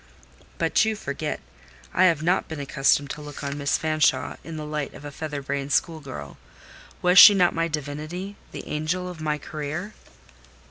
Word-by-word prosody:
"But - - +2
you 220 0 0
forget: 150 - -4 0.5
I 185 - +5
have 165 -4 +3
not 180 +3 +1
been 160 -2 -6
accustomed 140 0 +1
to 150 - -7
look 150 0 -9
on 140 0 -3
Miss 140 -1 0
Fanshawe 155 -4 +1
in 165 -1 -7
the 155 - -5
light 150 -2 -4
of 145 - -11
a 145 - -6
feather 145 -1 -5
brained 140 0 -3
school 160 +2 +1
girl. 75 - -9 0.6
Was 180 +1 +7
she 205 - +11
not 180 -2 +3
my 165 0 0
divinity—the 155 +6 -6
angel 160 +4 -2
of 175 -3 -8
my 150 -1 0
career?" 155 +7 -5
155 Hz, 175 wpm, -25 LUFS, 145-170 Hz, 0.6 s, she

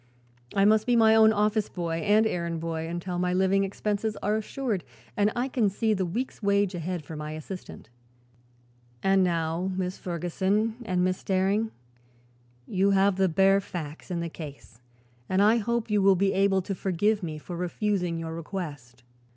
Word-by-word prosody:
I 195 0 +4
must 215 +2 +4
be 245 - +3
my 220 -1 +6
own 220 0 +7
office 210 0 +1
boy 170 -2 -3
and 210 +5 +3
errand 170 -5 -2
boy 160 0 -3
until 175 +1 -4
my 180 0 0
living 190 +1 +3
expenses 210 +2 -2
are 210 +1 +1
assured 220 -2 -2 0.3
and 205 +1 +2
I 245 +2 0
can 240 -6 +1
see 220 +3 0
the 190 -3 -1
week's 235 +10 -4
wage 200 -1 +2
ahead 175 -2 -4
for 160 - -8
my 150 0 -5
assistant. 155 - -8 1.2
And 195 0 +4
now, 170 +1 0
Miss 185 0 -3
Ferguson 190 +6 -1
and 180 -3 +1
Miss 185 0 -1
Daring, 195 +3 +1 1.0
you 195 +3 +1
have 195 -1 +3
the 190 -1 +3
bare 195 +3 +4
facts 160 -4 -7
in 175 -2 -2
the 170 - -2
case 145 -7 -10 0.5
and 185 - +1
I 215 +3 +5
hope 235 0 -1
you 210 -1 +3
will 195 0 +5
be 195 +2 +1
able 195 -1 +2
to 195 - -3
forgive 200 +3 0
me 160 -4 -4
for 175 +3 -7
refusing 180 0 -1
your 165 0 -5
request." 150 -8 -7
190 Hz, 175 wpm, -27 LUFS, 170-210 Hz, 1.2 s, own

